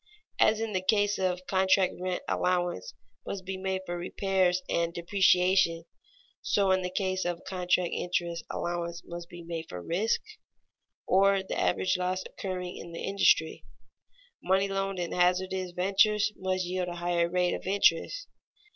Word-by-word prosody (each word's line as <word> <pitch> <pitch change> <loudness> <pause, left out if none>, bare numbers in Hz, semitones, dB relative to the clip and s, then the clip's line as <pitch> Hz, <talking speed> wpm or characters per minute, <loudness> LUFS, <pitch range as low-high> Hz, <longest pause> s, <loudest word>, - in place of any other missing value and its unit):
As 215 0 +4
in 225 -1 -3
the 185 - 0
case 205 +1 +2
of 185 -1 -1
contract 190 0 +3
rent 185 -1 -2
allowance 180 - -1 0.3
must 190 -2 -6
be 190 +1 -4
made 190 0 -2
for 175 - -4
repairs 185 0 +1
and 170 0 0
depreciation, 180 -1 +3 0.6
so 195 -2 +2
in 185 0 +3
the 180 - -2
case 185 0 -1
of 175 -1 -3
contract 180 -1 0
interest 170 -1 -2
allowance 170 0 -3
must 170 0 -8
be 175 -1 -10
made 165 -1 -5
for 90 - -6
risk, 185 - 0 0.9
or 195 +1 +3
the - - -5
average 185 0 +1
loss 185 +1 -1
occurring 180 -2 -5
in 170 - -9
the 165 - -6
industry. 195 -5 +2 0.8
Money 190 +2 +2
loaned 195 0 -2
in 175 -1 -3
hazardous 185 +1 +1
ventures 205 +3 +3
must 185 -1 -1
yield 180 0 -2
a 175 - -5
higher 175 0 0
rate 180 0 +1
of - - -5
interest. 200 - +2
185 Hz, 155 wpm, -29 LUFS, 175-190 Hz, 0.9 s, As